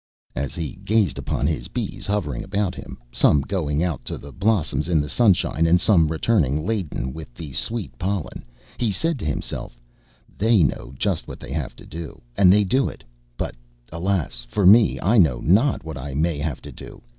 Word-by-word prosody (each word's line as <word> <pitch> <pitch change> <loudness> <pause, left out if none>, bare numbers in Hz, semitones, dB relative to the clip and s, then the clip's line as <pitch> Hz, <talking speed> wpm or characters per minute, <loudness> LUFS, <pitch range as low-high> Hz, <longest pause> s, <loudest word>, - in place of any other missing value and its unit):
As 65 +2 -3
he 85 +3 -5
gazed 105 -5 +1
upon - - -2
his 75 0 -1
bees - - -4
hovering 85 -12 -1
about 100 -2 -1
him, 75 - -9
some 70 +3 +4
going 75 -2 -1
out 80 -9 -2
to - - -3
the 70 - -11
blossoms 85 -7 0
in 85 -3 +3
the 75 - -1
sunshine, 85 - +2
and 85 +2 +5
some 85 -5 +4
returning 80 - +1
laden 90 - -2
with 80 -5 -9
the 75 -5 -8
sweet 115 - -2
pollen, 95 -2 -3 0.4
he 115 -4 +1
said 165 - 0
to - - -5
himself, 65 -4 -4 0.6
"They 110 -2 +4
know 65 -2 -2
just 95 -2 -1
what - - -8
they - - -9
have 75 -3 -3
to - - -14
do, 80 -1 -8 0.2
and 90 -2 +6
they 105 +2 +5
do 130 +7 +1
it; - - -12 0.3
but - - -3 0.4
alas 85 -8 -1
for 100 +9 0
me! 105 +3 +6
I 110 +5 +4
know 70 -10 +4
not 110 - +3
what 80 -4 -6
I 70 +1 -6
may 80 0 0
have 75 -3 -3
to - - -8
do. - - -12
85 Hz, 190 wpm, -23 LUFS, 75-100 Hz, 0.6 s, and